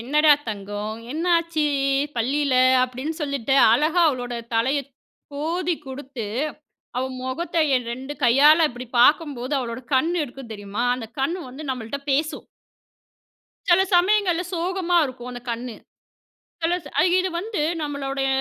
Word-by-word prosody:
"என்னடா 300 +5 +4 0.2
தங்கம்! 205 +1 -5 0.2
என்னாச்சு 335 -1 +1 0.5
பள்ளில." 270 +4 +1 0.3
அப்டின்னு 260 +5 -5
சொல்லிட்டு 280 -3 -1 0.2
அழகா 310 +8 +3
அவளோட 245 -4 -3 0.2
தலைய 260 +6 +2 0.5
கோதி 335 +4 -1
குடுத்து, 265 -3 -6 0.7
அவ 250 - 0 0.2
முகத்த 260 +8 -4 0.2
என் 245 -2 -3
2 265 +3 -6
கையால 295 +7 +6
இப்டி 245 +1 -8
பார்க்கும்போது, 285 -2 +3
அவளோட 235 0 -5
கண்ணு 330 +7 +2
இருக்கும் 255 -2 -11
தெரியுமா? 205 +2 -4
அந்த 240 -3 -6
கண்ணு 330 +7 -1
வந்து 280 +5 -9
நம்மள்ட்ட 250 +1 -4
பேசும்! 300 +3 -1 1.2
சில 350 +2 +6
சமயங்கள்ல 360 -1 +3
சோகமா 355 0 0
இருக்கும் 250 -2 -7
அந்த 245 0 -7
கண்ணு. 235 0 -4 0.9
சில 340 +2 +2 0.2
அ - - +6 0.2
இது 370 0 0
வந்து 410 -3 -3 0.2
நம்மளுடைய 275 -2 -2
280 Hz, 125 wpm, -23 LUFS, 245-330 Hz, 1.2 s, கையால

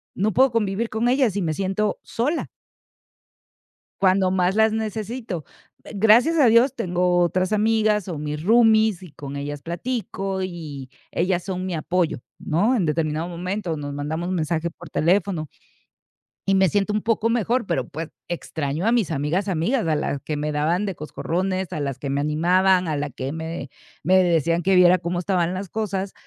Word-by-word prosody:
No 210 +3 0
puedo 265 +3 +4
convivir 225 0 -1
con 220 +2 0
ellas 255 -6 +2
y 200 - 0
me 160 -3 0
siento 195 +4 -1
sola. 285 +8 -2 1.5
Cuando 190 0 +4
más 185 0 +1
las 220 0 +4
necesito, 220 - -4 0.4
mm, - - -12
gracias 235 +10 +5
a 285 - +6
Dios, 235 +4 +4
tengo 180 -4 +1
otras 185 +2 +1
amigas, 215 -1 +2
o 170 -4 -4
mis 150 +1 -4
roomies, 220 -2 +4
y 180 -4 -11
con 140 0 -8
ellas 145 0 -5
platico, 195 0 -3
y 155 -7 -7 0.2
ellas 180 0 0
son 185 -1 -4
mi 185 - -3
apoyo, 170 0 0 0.2
¿no? 205 +11 +1
En 200 -8 +1
determinado 155 +1 -1
momento 180 0 -3
nos 145 -1 -5
mandamos 160 +5 -3
mensaje 170 -1 -1
por 170 0 -13
teléfono. 175 -1 +1 1.0
Y 195 - +4
me 190 -1 +4
siento 205 +4 0
un 210 - 0
poco 225 0 +1
mejor, 235 +1 +1
pero, 170 - -1
pues, 160 +2 -5 0.2
extraño 155 -1 -3
a 235 - +4
mis 220 -8 +1
amigas, 160 +7 -1
amigas 190 +7 0
a 155 -2 +1
las 140 -1 -2
que 150 -2 -4
me 150 +1 -2
daban 165 +7 +1
de 195 -3 -3
coscorrones, 185 +4 -3
a 150 - -3
las 140 -2 -3
que 140 - -4
me 140 +1 0
animaban 180 +4 +3
a 155 - -1
la 145 0 -2
que 135 +1 -5
me 160 -2 -5 0.3
me 185 +3 +5
decían 170 0 +1
que 195 +2 +3
viera 180 0 +6
cómo 175 0 -3
estaban 180 -1 0
las 190 +1 -4
cosas. 195 -1 -3
180 Hz, 180 wpm, -23 LUFS, 160-210 Hz, 1.5 s, a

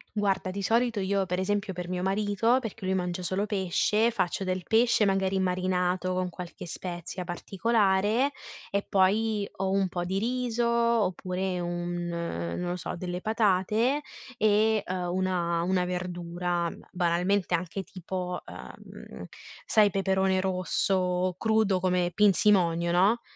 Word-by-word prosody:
Guarda, 195 -2 0
di 200 +2 -4
solito 230 +2 +1
io 195 0 0
pre 180 0 -2
esempio, 200 0 -1
per 180 0 -6
mio 180 0 -2
marito, 205 +5 +2
perché 225 -3 -6
lui 190 - +1
mangia 180 -1 -2
solo 190 +4 -1
pesce, 210 +3 +1
faccio 195 -3 -1
del 185 -1 -1
pesce 225 +2 +3
magari 195 0 +1
marinato 185 0 0
con 185 0 -1
qualche 175 0 -8
spezia 175 +1 -6
particolare, 205 +6 +1 0.4
e 200 0 -1
poi 205 +2 +2
o 190 0 -1
un 195 -1 +1
po' 175 -1 -3
di 190 +2 -1
riso 240 0 0
oppure 190 -6 0
un 175 0 -3
non 170 - -3
lo 175 - -1
so, 180 - -5
delle 180 0 -4
patate 220 +6 +1 0.3
e, 215 0 +3
ehm, 180 -1 -3
una 175 -2 0
una 180 0 +1
verdura, 175 -1 -2 0.2
banalmente 180 +2 +1
anche 180 +3 -3
tipo, 180 -1 -5
ehm, - - -10 0.4
sai 210 -2 +4
peperone 190 -1 +1
rosso, 185 0 0
crudo 220 -4 +2
come 180 -1 +1
pinzimonio, 180 -4 +3
no. 200 +7 +3
190 Hz, 135 wpm, -28 LUFS, 180-205 Hz, 0.4 s, sai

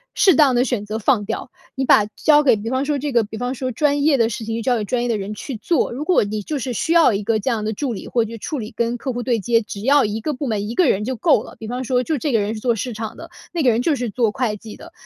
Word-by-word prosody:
适 380 - +5
当 280 -3 +4
地 245 +1 +3
选 245 -6 -2
择 215 +1 -4
放 225 0 +2
掉。 225 +4 -5 0.2
你 265 - -1
把 210 -4 +5
交 300 -1 +4
给 260 -5 +4
比 220 +3 -5
方 260 +1 0
说 295 0 0
这 285 +1 -3
个 235 -3 +3
比 215 +1 -8
方 245 +2 -2
说 255 0 -3
专 285 +2 +1
业 295 -2 +4
的 230 -2 +3
事 230 0 -5
情 225 0 -3
就 230 - -3
交 250 +1 +2
给 220 - -1
专 240 +4 -1
业 - - -1
的 235 - 0
人 200 +2 -5
去 265 +5 -6
做， 270 +10 0
如 270 +5 -4
果 360 -4 +3
你 210 +1 -3
就 295 +9 -4
是 255 -1 -3
需 235 - -2
要 330 -8 +5
一 200 - -1
个 220 +1 0
这 240 +6 -1
样 220 -2 -1
的 215 - -1
助 245 +3 -3
理， 200 - -7
或 235 -2 +1
者 220 - -9
就 230 - -8
处 300 - -4
理 220 -3 -6
跟 235 +1 -1
客 260 +1 -4
户 245 - -3
对 240 -2 0
接， 230 +3 +2
只 210 -2 -8
要 275 +4 +4
1 210 +1 -2
个 300 - -2
部 275 +1 -4
门 210 -3 -2
1 225 - -4
个 335 0 +3
人 195 - +1
就 260 +2 -2
够 300 +6 +3
了， - - -12
比 220 - -7
方 250 +3 -3
说 250 0 +1
就 310 +4 -1
这 285 +3 -2
个 225 - +4
人 210 +2 -2
是 - - -6
做 235 +1 +1
市 235 +3 -4
场 220 0 -6
的， 330 - -10 0.2
那 340 - -2
个 265 - +4
人 235 +1 +1
就 315 0 +2
是 245 -3 -3
做 225 0 +1
会 225 -1 -1
计 215 +1 -10
的， 340 - -13
240 Hz, 350 characters per minute, -20 LUFS, 220-270 Hz, 0.2 s, 适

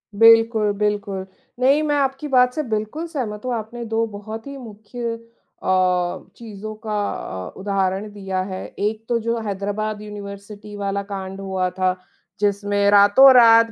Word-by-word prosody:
बिल्कुल, 225 -1 +5
बिल्कुल। 205 -2 -1 0.3
नहीं, 275 +4 +4
मैं 295 -1 +1
आपकी 275 +1 -1
बात 250 -2 +4
से 310 - -2
बिल्कुल 220 +7 -3
सहमत 240 -9 -5
हूँ। 250 - -1
आपने 235 +2 -6
2 225 0 0
बहुत 215 +3 -8
ही 280 - -7
मुख्य 230 0 -6 0.5
अ, 180 -1 +1
चीज़ों 215 -2 -8
का 215 - -2 0.5
अ, - - -7
उदाहरण 195 +1 -1
दिया 190 -2 -3
है। 185 - -5
1 215 +2 -1
तो 235 - +2
जो 230 +1 -1
हैदराबाद 205 +2 -3
यूनिवर्सिटी 205 0 -9
वाला 200 0 -2
कांड 195 -1 -6
हुआ 190 -1 -1
था, 185 0 0 0.4
जिसमें 205 0 +1
रातों-रात 230 +2 +7
210 Hz, 145 wpm, -21 LUFS, 200-230 Hz, 0.5 s, रातों-रात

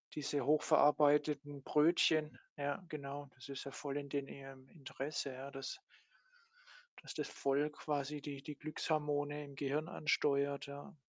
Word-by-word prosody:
Diese 145 -2 -1
hoch 150 +1 +4
verarbeiteten 145 -1 +4
Brötchen 155 0 +4 0.2
ja, 145 +5 -1
genau, 140 -1 -5
das 130 +2 -12
ist 140 0 -5
ja 140 - -5
voll 140 0 -4
in 145 -1 -3
den 140 0 -1
ihrem 135 -1 -10
Interesse, 140 -2 -4
ja, 135 +2 -7
dass 135 - -5 1.2
dass - - -7
das - - -2
voll 140 +2 +1
quasi 150 -1 -2
die 140 -1 -6
die 150 +2 -7
Glückshormone 150 -1 -1
im 140 - -11
Gehirn 145 +3 -1
ansteuert, 140 -4 +1
ja. 145 +7 -9
145 Hz, 145 wpm, -37 LUFS, 140-150 Hz, 1.2 s, hoch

